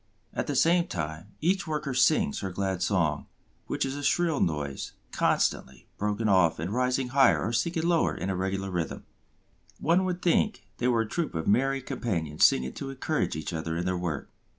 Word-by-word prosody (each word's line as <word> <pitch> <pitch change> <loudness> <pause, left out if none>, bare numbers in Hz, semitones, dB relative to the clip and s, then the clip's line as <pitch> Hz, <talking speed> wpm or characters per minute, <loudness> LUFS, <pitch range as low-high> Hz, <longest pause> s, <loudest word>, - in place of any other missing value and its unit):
At - - -2
the - - -1
same 170 +1 +4
time, 80 +2 -4
each 185 +3 +1
worker 150 -3 -2
sings 160 - +3
her 95 - -3
glad 95 0 -2
song, 85 -6 0 0.4
which - - -1
is 135 0 -3
a 145 - -5
shrill 165 +1 +2
noise, 75 -4 -2 0.2
constantly - - 0
broken 105 +2 0
off 90 -5 +4
and 85 +6 -3
rising 125 +1 0
higher 135 +1 +4
or 115 - -2
sinking 165 +6 0
lower 170 -1 +2
in 95 - -3
a - - -2
regular 95 +1 -2
rhythm. 90 -3 -3 0.8
One 170 +4 +3
would 180 -1 -3
think 210 +5 +2 0.2
they 120 - +1
were 120 -2 +3
a 115 - -2
troop 165 - -3
of 80 - -2
merry 135 +5 +2
companions 80 -13 -2
singing 65 0 -1
to 135 - -6
encourage 135 - -1
each 80 +3 -4
other 80 0 -3
in 85 - -2
their 90 0 0
work. 85 -5 -4
110 Hz, 190 wpm, -28 LUFS, -, 0.8 s, same